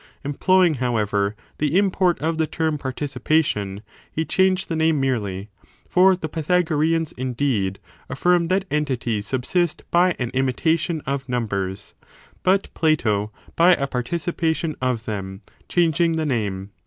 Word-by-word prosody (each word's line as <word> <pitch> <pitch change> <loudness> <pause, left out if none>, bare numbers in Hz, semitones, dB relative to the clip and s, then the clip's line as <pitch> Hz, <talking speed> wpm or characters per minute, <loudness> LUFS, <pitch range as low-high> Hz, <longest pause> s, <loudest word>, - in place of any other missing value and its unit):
Employing, 175 +5 +3
however, 105 -4 0 0.2
the 150 +3 +1
import 190 -3 +2
of 160 +1 -1
the 160 - +2
term 160 -2 -1
participation, 130 -6 -1 0.3
he 160 - -2
changed 190 +1 +2
the 165 - -2
name 160 -1 +2
merely; 105 -7 -2 0.4
for 185 +1 +5
the 170 -3 -5
Pythagoreans, 160 0 +1
indeed, 125 -7 -1 0.3
afl&rm 175 -1 +2
that 190 +2 +1
entities 125 -8 -1
subsist 155 +6 0
by 175 +1 +4
an 125 -2 -3
imitation 155 +5 0
of 135 -1 -3
numbers: 100 -6 -3 0.5
but 195 +2 +1
Plato, 110 -10 +1 0.2
by 175 +2 +6
a 140 - -1
participation 160 +4 -2
of 125 -3 -1
them, 95 -1 -5 0.3
changing 170 -1 +2
the 160 -1 -1
name. 100 -7 -2
150 Hz, 130 wpm, -22 LUFS, 120-165 Hz, 0.5 s, by